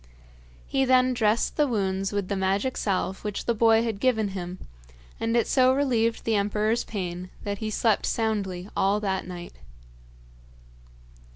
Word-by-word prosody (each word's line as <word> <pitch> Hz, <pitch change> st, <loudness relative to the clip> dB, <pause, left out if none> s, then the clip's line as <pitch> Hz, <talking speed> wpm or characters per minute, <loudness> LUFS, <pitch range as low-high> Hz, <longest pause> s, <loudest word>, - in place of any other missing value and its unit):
He 270 Hz, -, +1 dB
then 255 Hz, 0 st, +4 dB
dressed 225 Hz, -1 st, +1 dB
the 300 Hz, -1 st, +3 dB
wounds 195 Hz, -4 st, -1 dB
with 200 Hz, -2 st, -2 dB
the 200 Hz, -, -2 dB
magic 195 Hz, +6 st, 0 dB
salve 190 Hz, -1 st, -2 dB
which 210 Hz, -2 st, -4 dB
the 235 Hz, -, +2 dB
boy 225 Hz, 0 st, +4 dB
had 225 Hz, -4 st, -3 dB
given 220 Hz, -4 st, +1 dB
him, 180 Hz, -1 st, -6 dB, 0.6 s
and 230 Hz, +1 st, +1 dB
it 235 Hz, -, +3 dB
so 260 Hz, -1 st, +4 dB
relieved 235 Hz, -5 st, +1 dB
the 225 Hz, -, 0 dB
emperor's 210 Hz, +3 st, +1 dB
pain 180 Hz, -3 st, -5 dB
that 200 Hz, -1 st, -3 dB
he 220 Hz, -, -3 dB
slept 215 Hz, 0 st, +1 dB
soundly 200 Hz, -5 st, -1 dB
all 200 Hz, +2 st, +2 dB
that 190 Hz, -3 st, -2 dB
night. 175 Hz, -1 st, -8 dB
210 Hz, 155 wpm, -26 LUFS, 195-230 Hz, 0.6 s, then